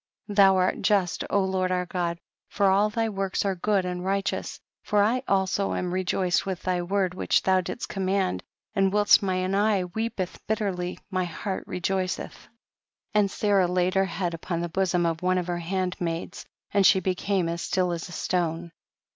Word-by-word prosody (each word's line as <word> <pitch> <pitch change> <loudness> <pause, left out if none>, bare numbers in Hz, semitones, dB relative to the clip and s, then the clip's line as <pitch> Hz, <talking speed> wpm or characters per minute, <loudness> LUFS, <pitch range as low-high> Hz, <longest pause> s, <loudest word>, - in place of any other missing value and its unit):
Thou 195 -2 +5
art 185 0 +1
just 195 -5 +1
Lord 190 -2 +1
our 180 0 0
God, 175 -2 -2 0.3
for 200 -2 +2
all 205 +2 +3
thy 225 +1 -1
works 195 -2 -2
are 195 - +1
good 190 +1 0
and 180 0 -3
righ 195 +1 +1
teous; - - -3 0.2
for 205 -1 +2
I 240 +5 +2
also 195 0 +1
am 180 -1 -2
rejoiced 185 -1 +1
with 190 -2 -4
thy 180 -1 0
word 185 0 0
which 185 - +1
thou 190 -1 +3
didst 185 - -5
command, 190 -1 -1 0.3
and 195 -2 +2
whilst 205 0 +5
mine 185 -1 -1
eye 205 -1 +2
weepeth 210 0 -4
bitterly 190 -5 -2 0.2
7}iy 185 -1 +1
heart 190 +3 -5
rcjoiceth. 185 +1 -1
83. - - -10 0.6
And 210 -2 +3
Sarah 200 -2 +2
laid 180 +1 +1
her 195 0 +3
head 180 -2 -3
upon 170 +1 -3
the 175 - -3
bosom 180 -1 +1
of 165 -1 -1
one 185 0 +2
of 180 - -1
her 175 -1 -2
handmaids, 175 -1 -3 0.2
and 200 -1 +3
she 190 0 +6
became 185 0 0
as 170 +1 -3
still 180 -1 0
as 170 +1 -4
a - - -10
stone. 170 -1 -2
185 Hz, 180 wpm, -26 LUFS, 180-195 Hz, 0.6 s, she